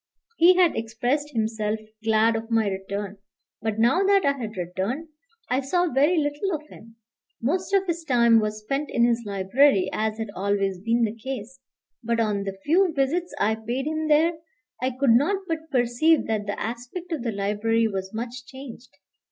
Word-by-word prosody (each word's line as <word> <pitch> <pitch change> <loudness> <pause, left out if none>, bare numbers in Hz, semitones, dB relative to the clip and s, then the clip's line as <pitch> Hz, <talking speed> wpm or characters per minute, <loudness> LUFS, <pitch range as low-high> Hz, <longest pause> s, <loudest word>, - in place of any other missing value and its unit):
He 350 +2 +7
had 360 -2 +4
expressed 240 +6 -1
himself 220 -3 -1 0.3
glad 225 +1 +3
of 225 +1 -4
my 225 -2 +2
return; 200 +1 -4 0.4
but 220 0 -2
now 240 +11 +3
that 395 -2 +3
I 280 - +4
had 225 -6 -6
returned, 190 - -3 0.4
I 255 - +1
saw 350 +5 0
very 290 +7 +3
little 300 +5 0
of 305 0 -8
him. 225 +1 -15 0.4
Most 360 +11 -1
of 390 -1 +3
his 340 -2 -2
time 235 -5 +4
was 215 0 -2
spent 275 +6 -2
in 235 - +3
his 235 0 +1
library, 200 +3 +3
as 220 0 -1
had 220 -2 -4
always 195 -1 0
been 230 +4 +1
the 215 -2 0
case. 255 +1 -7 0.4
But 235 0 0
on 210 -3 0
the 195 -1 -5
few 355 +4 +3
visits 310 +6 0
I 215 - +2
paid 235 +5 -3
him 310 0 -2
there, 320 +2 +3 0.4
I 255 - +1
could 260 0 +1
not 290 - +4
but 320 -1 -4
perceive 255 +5 +2
that 215 -2 -2
the 205 - -3
aspect 245 - -6
of 315 -6 -2
the 235 -1 -2
library 210 +3 +1
was 190 -2 -4
much 240 +2 -6
changed. 250 -5 -11
235 Hz, 180 wpm, -25 LUFS, 215-295 Hz, 0.4 s, He